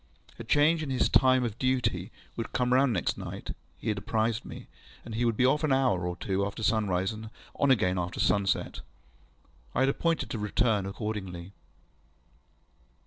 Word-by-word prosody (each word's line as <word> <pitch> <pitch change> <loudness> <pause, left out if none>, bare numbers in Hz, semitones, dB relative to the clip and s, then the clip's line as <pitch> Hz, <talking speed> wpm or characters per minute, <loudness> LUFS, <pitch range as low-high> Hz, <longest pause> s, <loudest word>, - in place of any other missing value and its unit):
A - - -5
change 150 +7 +3
in 155 - -4
his 130 - +1
time 130 -1 +4
of 115 -2 -4
duty 120 -7 0 0.2
would 115 - -5
come 125 0 +1
round 130 0 +4
next 95 -6 -1
night, - - -6 0.3
he - - -4
had 105 -2 0
apprised 110 +2 -1
me, - - -9 0.4
and 115 - -7
he 120 +2 0
would 115 -2 +1
be 125 - +4
off 150 +4 +2
an 155 - +1
hour 125 -10 +2
or 90 - -3
two 95 +2 -1
after 100 +2 -4
sunrise, 100 -3 +1
and 110 0 -8 0.3
on 140 - +3
again 95 -8 +3
soon 90 - +1
after 90 - -6
sunset. 100 -3 +1 0.9
I 130 - +2
had 135 - +4
appointed 165 +4 0
to 115 - -3
return 105 -1 +1
accordingly. 95 -4 -5
110 Hz, 180 wpm, -29 LUFS, 100-130 Hz, 0.9 s, time